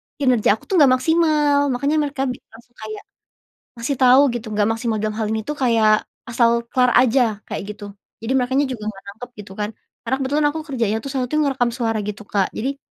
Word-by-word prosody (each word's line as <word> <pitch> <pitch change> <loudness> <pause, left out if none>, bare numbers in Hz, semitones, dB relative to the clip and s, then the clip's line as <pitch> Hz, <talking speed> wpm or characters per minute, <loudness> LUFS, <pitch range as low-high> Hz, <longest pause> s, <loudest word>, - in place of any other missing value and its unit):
kinerja 250 -7 +2
aku - - -20
tuh 390 - 0
enggak 280 -4 +6
maksimal 300 -3 +2
makanya 280 +4 0
mereka 285 -2 -2
langsung 240 -2 -8
kayak, 215 -1 -7 0.8
ngasih 270 +4 -2
tahu 255 +1 +6
gitu 240 -1 -5
enggak 210 0 +1
maksimal 225 0 -1
dalam 215 0 -2
hal 220 -1 -1
ini 220 - -1
tuh 300 - -3
kayak 225 -5 +3 0.2
asal 235 0 +2
kelar 250 0 +2
aja 245 -4 +2
kayak - - -4
gitu 210 0 -11 0.4
jadi 225 +3 -3
merekanya 265 +3 +1
juga 240 -5 -6
nggak 195 -2 -14
nangkep 220 +5 -9
gitu 205 -2 -11
kan, 210 0 -3 0.3
karena 250 +3 0
kebetulan 290 +3 +1
aku 320 - -4
kerjanya 230 -6 -1
tuh 275 - -7
saat 265 -2 -2
itu - - +1
ngerekam 265 -5 +1
suara 230 -2 -1
gitu 210 +1 -6
Kak 195 -2 0
jadi, 270 +5 -3
245 Hz, 200 wpm, -20 LUFS, 220-275 Hz, 0.8 s, enggak